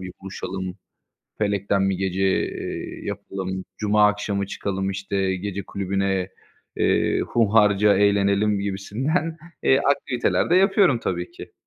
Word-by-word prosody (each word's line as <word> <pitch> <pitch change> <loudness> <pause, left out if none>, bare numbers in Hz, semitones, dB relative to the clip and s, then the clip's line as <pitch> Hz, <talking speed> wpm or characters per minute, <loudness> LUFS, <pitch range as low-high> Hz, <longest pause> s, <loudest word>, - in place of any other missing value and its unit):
bir 90 -1 -7
buluşalım, 95 -1 -5 0.6
felekten 100 -1 +1
bir 95 - 0
gece, 95 0 -1
eee, 95 - -3
yapalım. 95 -1 -5
Cuma 105 0 +4
akşamı 100 -1 -2
çıkalım, 95 -1 -3
işte, 95 0 -1
gece 100 +1 -4
kulübüne, 95 -1 -1 0.5
eee, - - +2
hunharca 105 -2 +3
eğlenelim." 100 0 +3
gibisinden, 130 - -2 0.3
eee, 135 - +4
aktiviteler 125 -1 0
de - - +5
yapıyorum 195 - +4
tabii 90 -4 -3
ki. - - -11
100 Hz, 120 wpm, -23 LUFS, 95-105 Hz, 0.6 s, de